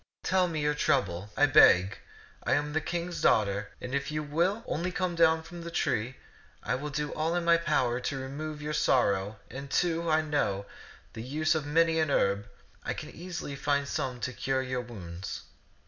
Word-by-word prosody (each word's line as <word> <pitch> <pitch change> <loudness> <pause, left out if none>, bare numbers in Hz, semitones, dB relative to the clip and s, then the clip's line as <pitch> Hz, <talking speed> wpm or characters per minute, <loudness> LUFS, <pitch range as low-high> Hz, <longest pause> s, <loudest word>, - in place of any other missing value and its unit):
Tell 185 -1 +2
me 160 -3 -3
your 150 0 +2
trouble, 105 - 0
I 145 - +6
beg. 100 -9 +6 0.4
I - - +1
am 150 +1 0
a 160 - +2
king's 175 +2 -3
daughter, 100 -1 +2
and 125 - -6
if 140 0 -1
you 155 0 -2
will 170 +9 0
only 175 +3 -2
come 180 -1 -1
down 160 -1 +4
from 175 +1 -9
the 170 - -6
tree, 130 -6 -1 0.5
I 115 - -1
will 140 +4 -3
do 150 0 -3
all 160 +2 0
in 175 -1 -1
my 170 0 +6
power 130 -7 +1
to 135 +2 -3
remove 150 +3 -5
your 150 +1 -3
sorrow; 105 -8 +2
and, 135 +3 -7
too, 170 +3 +1
I 160 0 +3
know 105 -10 0 0.5
the 110 - -6
use 155 +7 0
of 155 -2 -2
many 165 +2 +3
an 155 -2 +1
herb, 100 -7 +2
and 105 - -14 0.4
I - - -2
can - - -7
easily 175 -4 -6
find 140 0 0
some 130 -3 -3
to 130 - -2
cure 130 +2 -1
your 130 -1 -2
wounds." 95 -6 -7
145 Hz, 195 wpm, -29 LUFS, 125-160 Hz, 0.5 s, I